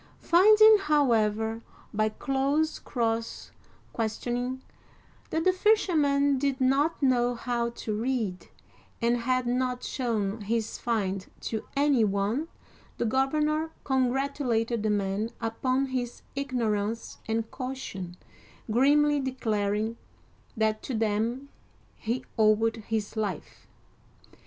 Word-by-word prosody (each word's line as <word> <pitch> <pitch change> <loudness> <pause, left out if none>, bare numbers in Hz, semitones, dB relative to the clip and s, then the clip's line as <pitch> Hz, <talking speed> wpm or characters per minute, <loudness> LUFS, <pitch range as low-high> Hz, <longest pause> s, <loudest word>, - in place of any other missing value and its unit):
Finding, 430 +5 +7
however, 225 - +1 0.3
by 215 +1 +1
close 275 +7 0
cross 230 -2 -2 0.4
questioning, 245 +3 -2 0.7
that 320 - -1
the 370 - +4
fisherman 295 -9 +3
did 275 -1 0
not 275 +4 +2
know 245 -2 +3
how 235 0 -1
to 230 -2 -5
read, 220 -4 -2 0.5
and 235 +1 +2
had 255 +1 0
not 250 0 -1
shown 220 -4 -2
his 220 +2 -2
find 195 -5 -1
to 220 -1 -4
any 280 -4 +3
one, 205 +9 0 0.5
the - - -1
governor 300 +6 +1
congratulated 255 -3 0
the 215 - 0
man 205 +1 0
upon 255 +4 0
his 255 -2 -4
ignorance 230 -5 -2
and 225 0 -2
caution, 250 -9 -6 0.5
grimly 290 +5 +4
declaring 220 -4 -1 0.6
that 220 0 +1
to 260 - -4
them 225 +5 -1 0.5
he 235 +3 -3
owed 220 +1 +3
his 220 -1 -2
life. 210 -3 -4
240 Hz, 105 wpm, -28 LUFS, 220-270 Hz, 0.7 s, Finding